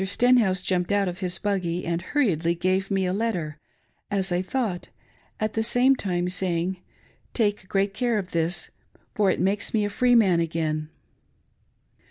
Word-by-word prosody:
Stenhouse 200 -2 +3
jumped 180 0 0
out 200 -1 +2
of 180 0 -5
his 185 -1 -2
buggy 185 -4 -2
and 170 0 -1
hurriedly 175 - +1
gave 185 +3 0
me 195 -2 +1
a 180 - 0
letter, 180 -9 -2 0.5
as 195 -2 -1
I 175 +1 +1
thought, 200 -3 -3 0.3
— - - -35
at 215 0 -1
the 225 - 0
same 250 +4 +4
time 180 -6 -2
saying, 180 0 0 0.3
" - - -35
Take 205 -4 0
great 195 0 +1
care 240 0 0
of 190 -3 -4
this 170 +1 -1 0.4
for 205 -2 +2
it - - 0
makes 200 +4 0
me 210 -1 +2
a 205 - -3
free 245 +3 +3
man 190 -7 +4
again." 155 -2 -2
190 Hz, 175 wpm, -25 LUFS, 175-210 Hz, 0.5 s, same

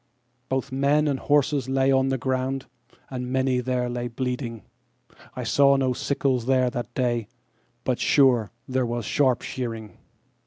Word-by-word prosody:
Both 130 +1 -2
men 140 +3 +2
and 140 -2 0
horse 145 0 +2 0.2
lay 135 0 +2
on 135 0 +3
the 135 0 0
ground, 130 +1 -2 0.5
and 125 -1 -4
many 130 -1 +1
there 125 0 -1
lay 120 0 -3
bleeding,I 120 -2 -7
saw 140 -1 +4
no 130 -2 +1
sickles 130 -2 -1
there 130 -2 +3
that 120 -3 -5
day—but, 120 0 -4
sure, 125 -7 +4 0.2
there 130 0 0
was 120 -2 -3
sharp 130 0 +2
shearing. 115 -4 -5
130 Hz, 140 wpm, -25 LUFS, 120-135 Hz, 0.5 s, saw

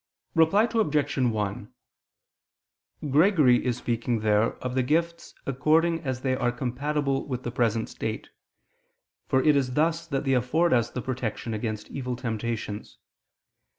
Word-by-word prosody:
Reply 165 +6 +4
Obj. 155 - +1
1: 110 -6 -1 1.4
Gregory 150 -5 +4
is 125 -2 -1
speaking 120 -1 -1
there 105 +1 +2
of 125 -1 -5
the 130 - +2
gifts 170 +6 -1
according 160 +5 +2
as 130 -5 -4
they 130 -1 0
are 125 -1 0
compatible 135 +3 -2
with 130 -2 -4
the 120 - -3
present 115 -2 0
state: - - -5 1.0
for 130 0 +2
it 150 -1 +5
is 130 -3 0
thus 165 +2 +1
that 140 -4 -2
they 135 -2 +1
afford 140 +7 +2
us 120 -2 +2
protection 125 -3 -4
against 110 -1 -4
evil 125 -2 -3
temptations. 115 -3 -4
130 Hz, 135 wpm, -26 LUFS, 120-150 Hz, 1.4 s, it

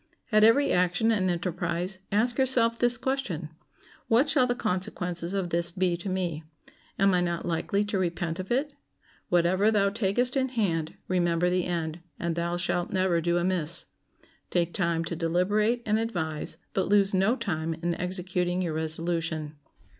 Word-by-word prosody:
At 215 -1 +5
every 275 +6 +5
action 180 +5 +2
and 190 -4 +1
enterprise 180 +1 -2
ask 235 +5 +2
yourself 235 -3 +2
this 240 -1 +2
question: 230 - -2 0.6
What 240 +6 +4
shall 265 -3 +4
the 245 - 0
consequences 180 -3 -2
of 185 -3 -2
this 170 0 +1
be 180 0 0
to 180 +3 -5
me? 175 -4 -2 0.5
Am 195 0 +4
I 180 - +3
not 170 -1 -2
likely 185 +4 0
to 205 -1 -1
repent 170 -1 -2
of 185 +3 -6
it? 280 +4 0 0.6
Whatever 180 +4 +3
thou 200 -2 +2
takest 225 +5 0
in 265 -1 +1
hand, 175 -10 -1
remember 175 -1 +1
the 180 -1 +1
end, 165 -2 -2 0.2
and 170 0 -2
thou 170 +1 -1
shalt 175 0 -1
never 185 -3 +1
do 170 +1 +1
amiss. 170 -2 -1 0.6
Take 175 -1 0
time 170 -3 0
to 170 - -3
deliberate 205 +8 +1
and 215 0 +2
advise, 175 -9 -3 0.2
but 190 - 0
lose 200 -1 +4
no 195 +6 +3
time 165 -8 -2
in 170 +1 -2
executing 180 0 -1
your 165 -3 -2
resolution. 160 -1 -1
180 Hz, 160 wpm, -27 LUFS, 170-210 Hz, 0.6 s, At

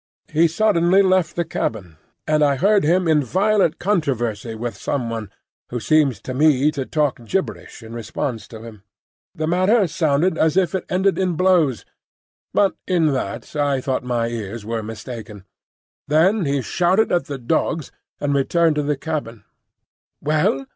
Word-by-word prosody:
He 165 +2 +5
suddenly 185 +1 +3
left 185 -3 +2
the 170 - -1
cabin, 100 - -4 0.3
and 155 -1 +2
I 140 -1 +3
heard 200 +7 +3
him 175 +3 +2
in 155 -2 +3
violent 190 - +2
controversy 120 - -1
with 120 +1 -4
some 125 -5 -3
one, 110 -3 -5 0.4
who 120 - -3
seemed 145 +1 +3
to 130 - -5
me 145 +1 +3
to 135 -3 -4
talk 145 -6 -1
gibberish 185 - -4
in 110 +1 -10
response 115 +1 -4
to 110 -1 -11
him. 110 -3 -11 0.5
The 155 - -2
matter 185 +6 +3
sounded 160 +1 +1
as 160 0 +2
though 190 - +5
it 185 +1 -3
ended 190 +2 +1
in 185 -2 +1
blows, 170 - +2 0.7
but 200 -1 +2
in 165 -5 +2
that 130 - -4
I 145 -2 +1
thought 130 0 -2
my 120 -2 -1
ears 115 -1 -6
were 115 0 -2
mistaken. 110 -2 -8 0.6
Then 170 +6 +3
he 140 -2 0
shouted 185 - +1
at 175 -6 +1
the 140 -1 -5
dogs, 155 +4 -1 0.3
and 145 -1 0
returned 155 +3 +2
to - - +2
the 145 -1 -1
cabin. 140 -8 -5 0.8
"Well?" 150 -2 +1
150 Hz, 160 wpm, -21 LUFS, 120-175 Hz, 0.8 s, He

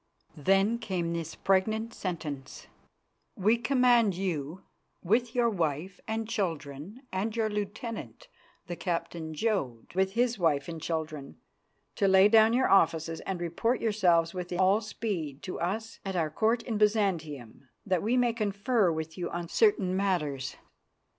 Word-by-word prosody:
Then 195 +9 +2
came 180 -6 -2
this 165 -1 -4
pregnant 220 +4 +1
sentence: 155 -7 -5 0.7
"We 210 +4 +3
command 240 -4 +3
you, 175 -2 -3 0.4
with 225 +6 +1
your 240 -1 +3
wife 175 -2 -2
and 220 0 -2
children 180 - -4
and 210 +4 -2
your 220 -2 0
lieutenant, 210 - -5 0.4
the 175 -2 -5
Captain 170 -2 -3
Jodd, 150 - -2
with 190 +1 +1
his 240 -1 +1
wife 150 -5 +1
and 165 -2 -6
children, 155 -4 -4 0.6
to 200 - +3
lay 190 +1 +6
down 220 +1 +6
your 260 +2 +3
offices 165 -3 +3
and 190 -2 -2
report 175 +8 0
yourselves 180 -6 +2
with 180 -1 -5
all 190 +4 +3
speed 185 -10 -4
to 185 - -5
Us 220 +6 -3
at 195 -1 -4
our 160 -3 0
Court 225 +8 +1
of 220 -4 -1
Byzantium, 160 - 0 0.2
that 185 -4 +1
we 235 +4 +1
may 245 -2 +3
confer 210 -2 +1
with 160 +2 -5
you 175 - -2
on 175 -1 -5
certain 195 - +3
matters. 150 -9 -1
190 Hz, 145 wpm, -29 LUFS, 165-220 Hz, 0.7 s, lay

